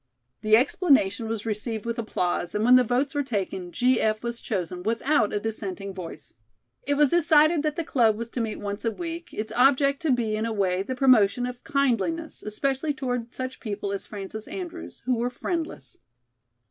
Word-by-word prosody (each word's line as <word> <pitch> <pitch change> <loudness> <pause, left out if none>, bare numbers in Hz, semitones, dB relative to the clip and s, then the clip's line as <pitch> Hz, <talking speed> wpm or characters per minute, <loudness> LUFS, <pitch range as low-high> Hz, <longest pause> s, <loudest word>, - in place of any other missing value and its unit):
The 215 0 +5
explanation 245 - +2
was 225 -1 -3
received 220 0 -3
with 235 0 -2
applause, 180 -5 -2
and 210 +1 +1
when 250 +1 +7
the 255 - +6
votes 250 +5 0
were 290 - +1
taken, 195 -8 -3
"G.F." 230 -1 +2
was 235 0 -4
chosen 180 -4 -3
without 230 +3 +1
a 210 - 0
dissenting 200 -3 -5
voice. 180 -3 -9 0.5
It 285 - +2
was 290 -2 +4
decided 315 -1 +5
that 305 0 -1
the 335 - -2
club 230 -8 +2
was 230 +1 -6
to 245 - -2
meet 220 -2 -3
once 205 0 -4
a 230 - +2
week, 335 +5 -6
it's 215 0 -4
object, 275 +2 +3
to 320 -3 +1
be, 230 -4 +1
in 220 +1 -1
a 225 - -2
way, 190 -3 +1
the 255 +6 -4
promotion 245 -3 +4
of 250 0 -7
kindliness, 280 +4 0
especially 275 +7 -1
toward 245 -4 -3
such 255 0 -5
people 205 -3 -4
as 200 - -4
Frances 210 +1 -7
Andrews, 345 -2 -7
who 250 -1 +1
were 240 +2 0
friendless. 280 - -4
235 Hz, 185 wpm, -26 LUFS, 210-275 Hz, 0.5 s, when